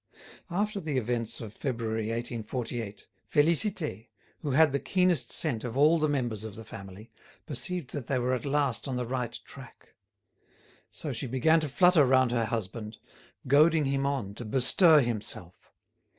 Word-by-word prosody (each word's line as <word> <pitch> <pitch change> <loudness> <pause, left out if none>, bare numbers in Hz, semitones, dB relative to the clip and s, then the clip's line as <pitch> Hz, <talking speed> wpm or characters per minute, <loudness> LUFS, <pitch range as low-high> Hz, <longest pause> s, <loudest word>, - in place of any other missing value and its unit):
After 205 +4 -1
the 155 -6 -3
events 120 -1 -2
of 110 -2 -8
February 115 -4 -3
1848, 115 -1 -5 0.3
Félicité, 155 - +2 0.3
who 150 - -4
had 150 +2 +4
the 140 - 0
keenest 180 -9 +1
scent 125 -9 +2
of 120 0 -5
all 155 +4 +5
the 155 0 +1
members 120 -7 -2
of 110 -3 -7
the 110 - -10
family, 100 +2 -11 0.3
perceived 170 +1 -4
that 140 -5 -5
they 135 - 0
were 125 +1 0
at 125 - -2
last 140 -2 0
on 130 - -3
the 125 0 -2
right 125 -1 -3
track. - - -13 1.0
So 150 - -6
she 125 +3 -2
began 145 +7 +3
to 155 -2 -3
flutter 180 +2 +5
round 130 -2 +3
her 120 -2 +1
husband, 110 0 -5 0.5
goading 155 +3 +4
him 135 0 0
on 130 -8 -2
to 115 - -8
bestir 145 - +4
himself. 105 -7 -4
130 Hz, 160 wpm, -28 LUFS, 115-150 Hz, 1.0 s, all